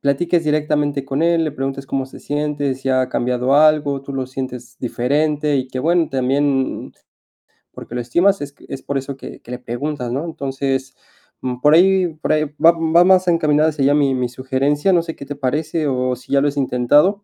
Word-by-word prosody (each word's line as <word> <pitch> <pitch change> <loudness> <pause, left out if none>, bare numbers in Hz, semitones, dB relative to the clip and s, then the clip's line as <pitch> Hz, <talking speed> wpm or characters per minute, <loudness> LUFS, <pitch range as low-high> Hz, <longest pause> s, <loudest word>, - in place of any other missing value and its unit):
platiques 165 +4 +1
directamente 150 -2 0
con 135 +2 -3
él, 170 0 +3
le 155 - -1
preguntes 135 -1 -4
cómo 135 -1 -2
se - - -13
siente, 145 -2 -2
si 135 0 -5
ha 130 -1 +2
cambiado 125 +2 0
algo, 150 -2 +3
tú 140 - -8
lo 135 -1 -2
sientes 125 -2 -7
diferente, 145 +4 0
y 130 -1 -1
que 130 0 -4
bueno, 165 +2 +2
también, 135 +1 -1 0.8
porque - - -11
lo 125 - -1
estimas 175 +10 +2
es 145 - -5
q - - -19
es 135 -1 -6
por 140 0 -3
eso 135 0 -5
que - - -10
que 120 - -12
le 125 - -5
preguntas, 125 +1 -4
¿no? 140 +6 -2
Entonces, 135 -3 -3 0.5
mm, 125 -1 -4
por 150 +2 +5
ahí 190 +1 +4
por 155 - -1
ahí 155 0 +1 0.2
va 165 - +9
va 165 +1 +3
más 185 -1 +4
encaminada 155 -2 +3
hacia 145 -3 -1
ya 145 - +4
mi 140 -3 +2
mi 125 -1 -1
sugerencia. 135 +7 0
No 170 -2 +3
sé, 165 -1 -6
¿qué 140 - -10
te 145 - -5
parece, 150 +3 -1
o 130 -1 0
si 125 - -16
ya 140 - +4
lo 145 - +2
has 145 - -3
intentado? 145 - +2
140 Hz, 210 wpm, -19 LUFS, 130-155 Hz, 0.8 s, va